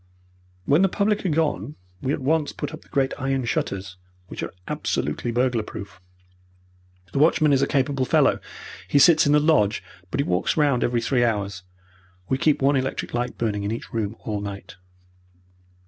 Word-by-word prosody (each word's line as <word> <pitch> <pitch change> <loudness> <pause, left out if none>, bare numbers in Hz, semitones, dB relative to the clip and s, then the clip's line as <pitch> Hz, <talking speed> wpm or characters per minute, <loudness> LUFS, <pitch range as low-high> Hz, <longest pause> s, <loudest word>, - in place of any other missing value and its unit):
"When 145 +5 +4
the 195 - +4
public 205 +2 0
are - - +1
gone, 150 - -1 0.3
we 135 - -1
at 145 - -2
once 155 +2 +1
put 145 +1 -5
up 155 - -8
the - - -23
great 135 -3 +1
iron 135 -2 -1
shutters, 95 -4 -3 0.3
which - - -6
are - - -4 0.2
absolutely 75 +11 -2
burglar 120 -1 +1
proof. 95 -4 -9 1.1
The - - -1
watchman 155 -1 +4
is 135 - +3
a 140 - +2
capable 135 -1 +1
fellow. - - +3 0.5
He - - +2
sits 155 +1 +6
in - - +3
the 150 - +6
lodge, 145 -9 +2 0.3
but 135 - -3
he - - +3
walks 90 - 0
round 145 -5 +3
every 120 -1 +1
three 120 0 +1
hours. 100 -4 -1 0.7
We 130 - +1
keep 150 -2 +2
one 140 +1 +4
electric 130 0 -2
light 120 0 -2
burning 105 -3 -1
in 100 +1 -2
each 115 - -6
room 110 -1 -2
all 105 -2 -3
night." 100 -3 -7
130 Hz, 180 wpm, -24 LUFS, 105-145 Hz, 1.1 s, sits